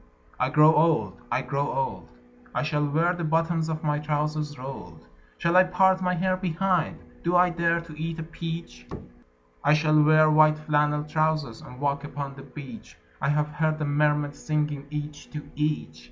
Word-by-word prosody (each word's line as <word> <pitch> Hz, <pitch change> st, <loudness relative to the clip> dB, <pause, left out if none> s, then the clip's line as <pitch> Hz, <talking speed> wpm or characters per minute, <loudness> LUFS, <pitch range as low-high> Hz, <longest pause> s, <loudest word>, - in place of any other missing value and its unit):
I 130 Hz, -, +1 dB
grow 150 Hz, +2 st, +6 dB
old... 150 Hz, -, +2 dB
I 130 Hz, +2 st, 0 dB
grow 140 Hz, +1 st, -2 dB
old... 95 Hz, -10 st, -3 dB, 0.5 s
I -, -, 0 dB
shall 150 Hz, -1 st, 0 dB
wear 165 Hz, +4 st, +2 dB
the 175 Hz, -1 st, -5 dB
bottoms 165 Hz, 0 st, 0 dB
of 160 Hz, 0 st, -3 dB
my 150 Hz, -1 st, 0 dB
trousers 150 Hz, 0 st, -2 dB
rolled. 90 Hz, -, -9 dB, 0.3 s
Shall 170 Hz, +1 st, 0 dB
I 185 Hz, -, +8 dB
part 190 Hz, +1 st, +3 dB
my 180 Hz, 0 st, +1 dB
hair 185 Hz, +1 st, +1 dB
behind? 185 Hz, 0 st, 0 dB, 0.3 s
Do 175 Hz, +1 st, +1 dB
I 180 Hz, 0 st, +5 dB
dare 170 Hz, 0 st, +1 dB
to 165 Hz, -2 st, -12 dB
eat 160 Hz, +1 st, -4 dB
a 165 Hz, -, -4 dB
peach? 165 Hz, -, -7 dB, 0.8 s
I 150 Hz, -, +5 dB
shall 155 Hz, 0 st, +3 dB
wear 155 Hz, 0 st, +5 dB
white 155 Hz, 0 st, +5 dB
flannel 150 Hz, -1 st, +1 dB
trousers, 155 Hz, -6 st, -1 dB
and 125 Hz, -, -12 dB
walk 140 Hz, 0 st, -1 dB
upon 140 Hz, -1 st, -6 dB
the 135 Hz, -, -11 dB
beach. 140 Hz, 0 st, -11 dB, 0.2 s
I -, -, +1 dB
have 150 Hz, 0 st, +1 dB
heard 155 Hz, +1 st, 0 dB
the 155 Hz, -, -2 dB
mermaids 145 Hz, 0 st, +1 dB
singing, 150 Hz, -2 st, -2 dB
each 150 Hz, 0 st, -6 dB
to 150 Hz, -2 st, -6 dB
each. 145 Hz, -, -2 dB
150 Hz, 180 wpm, -26 LUFS, 145-165 Hz, 0.8 s, I